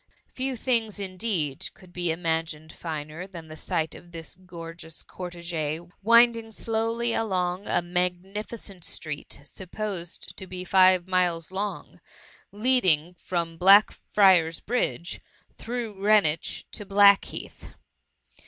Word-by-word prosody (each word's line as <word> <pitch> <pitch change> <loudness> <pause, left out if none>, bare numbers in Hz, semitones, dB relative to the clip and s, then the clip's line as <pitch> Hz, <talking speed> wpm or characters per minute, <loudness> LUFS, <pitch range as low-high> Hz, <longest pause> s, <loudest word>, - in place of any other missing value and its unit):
Few 260 0 -2
things, 225 -4 0
indeed, 185 -7 -2
could 180 -1 -18
be 175 -1 -1
imagined 160 -2 -2
finer 155 +2 -6
than 170 -4 -10
the 155 - -8
sight 160 0 -2
of 175 - -14
this 165 -1 -8
gorgeous 165 -3 -10
cortege^ 170 -2 -5
winding 230 +1 +5
slowly 230 +2 -1
along 185 -3 -1
a - - +1
magnificent 180 +3 -3
street, 150 -3 -4
supposed 185 +2 -6
to 190 - -6
be 185 0 -6
five 185 -1 +5
miles 180 -3 +1
long, 200 +2 -4 0.5
leading 200 -8 +3
from 170 -2 -3
Blackfriar^s 190 -3 +5
Bridge, 190 -7 -1 0.3
through 235 -2 -4
Greenwich, 195 -5 +2
to 210 - -6
Blackheath. 200 0 +3
185 Hz, 110 wpm, -26 LUFS, 165-210 Hz, 0.5 s, winding